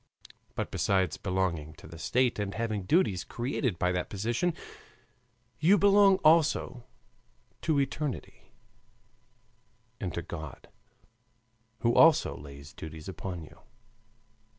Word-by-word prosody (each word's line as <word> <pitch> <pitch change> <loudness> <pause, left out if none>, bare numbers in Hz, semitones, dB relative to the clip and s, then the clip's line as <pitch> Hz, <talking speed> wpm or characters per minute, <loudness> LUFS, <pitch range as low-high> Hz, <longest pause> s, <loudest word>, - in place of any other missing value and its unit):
But - - -3
besides 95 -2 +1
belonging 90 -6 -2
to - - -15
the 85 - -11
state 120 +8 +1
and 100 -1 -3
having 110 -4 -2
duties 100 - +2
created 120 - -2
by 90 +1 +1
that 90 0 -2
position, 120 - -1 1.0
you 190 +6 +5
belong 200 0 +6
also 155 -6 +3 0.8
to 155 -3 +1
eternity 140 0 -4 1.5
and 95 -4 -3
to 85 - -3
God, 80 -4 -8 1.1
who 120 0 +2
also 165 -2 +5
lays 70 0 -11
duties 80 0 -9
upon 90 -2 -6
you. 80 +1 -15
100 Hz, 110 wpm, -29 LUFS, 85-140 Hz, 1.5 s, belong